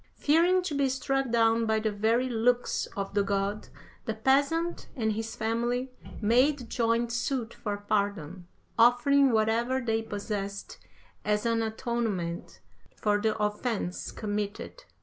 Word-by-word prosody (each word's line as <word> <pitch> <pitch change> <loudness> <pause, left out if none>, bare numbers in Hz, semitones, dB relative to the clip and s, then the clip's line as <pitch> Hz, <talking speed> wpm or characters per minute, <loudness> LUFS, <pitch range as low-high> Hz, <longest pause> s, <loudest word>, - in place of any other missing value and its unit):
Fearing 345 +5 +3
to 355 - -3
be 280 -1 +1
struck 270 0 -1
down 230 0 +3
by 220 0 +2
the 215 0 -1
very 225 +5 +1
looks 245 +1 +1
of 195 0 -3
the 205 - +3
god, 200 +1 -1 0.4
the 220 -3 -2
peasant 285 +9 +1
and 220 -5 0
his 225 +1 -4
family 240 +3 -1 0.3
made 245 +3 +2
joint 230 0 +1
suit 235 0 -2
for 205 -2 -4
pardon, 200 -5 -2 0.3
offering 250 +4 +5
whatever 230 +4 +1
they 225 -3 0
possessed 200 - -5 0.4
as 210 +1 0
an 230 -1 +1
atonement 220 -6 -3 0.3
for 205 -1 +1
the 220 0 0
offence 210 -3 -2
committed. 210 - -4
225 Hz, 130 wpm, -28 LUFS, 210-250 Hz, 0.4 s, offering